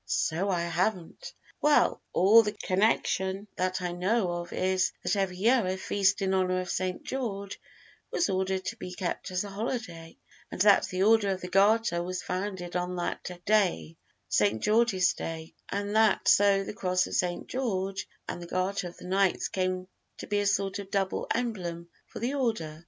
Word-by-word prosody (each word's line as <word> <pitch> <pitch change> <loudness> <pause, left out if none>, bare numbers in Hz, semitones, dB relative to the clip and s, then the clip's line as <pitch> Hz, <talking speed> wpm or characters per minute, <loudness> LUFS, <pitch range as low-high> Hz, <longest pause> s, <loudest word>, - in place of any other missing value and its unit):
"So 175 - 0
I 180 -3 +1
haven't; 175 0 -2 0.3
well, 295 0 +3
all 210 +5 +6
the 210 -2 -2
connection 195 -1 0
that 185 0 -1
I 175 - -1
know 185 +2 0
of 175 0 -5
is, 185 0 +1
that - - +1
every 190 -2 -1
year 235 +5 +3
a 185 +1 -1
feast 200 +1 +1
in 190 0 +1
honor 185 -1 +1
of 185 - -4
St. 185 0 -2
George 200 -7 -4 0.5
was 345 - +1
ordered 190 0 -1
to 230 - -3
be 180 -4 -7
kept 180 -2 -3
as 185 +1 -1
a 200 - -8
holiday, 195 -6 -5 0.3
and - - -8
that 205 0 +5
the 185 +1 -1
Order 220 -1 +4
of 190 -1 -2
the 180 - -5
Garter 200 -1 +3
was 180 +1 -4
founded 185 -1 -4
on 180 0 -1
that 175 0 -3 0.2
day 180 - +1 0.3
St. 105 +1 +1
George's 210 -4 +3
Day 160 -1 -6 0.2
and 205 +1 -3
that 220 -2 +3
so 200 -1 +5
the - - -6
Cross 185 -2 0
of - - -8
St. 175 -1 -1
George 195 -6 -2 0.2
and - - -5
the 175 - -8
Garter 185 +1 -1
of 175 - -11
the - - -12
Knights 190 0 +1
came 185 -1 -2 0.3
to - - -7
be 205 0 0
a 205 - 0
sort 200 0 0
of 200 -1 -8
double 195 -1 -1
emblem 180 -8 -3 0.2
for - - -10
the 245 +4 -2
order." 220 - -2
190 Hz, 185 wpm, -28 LUFS, 180-205 Hz, 0.5 s, all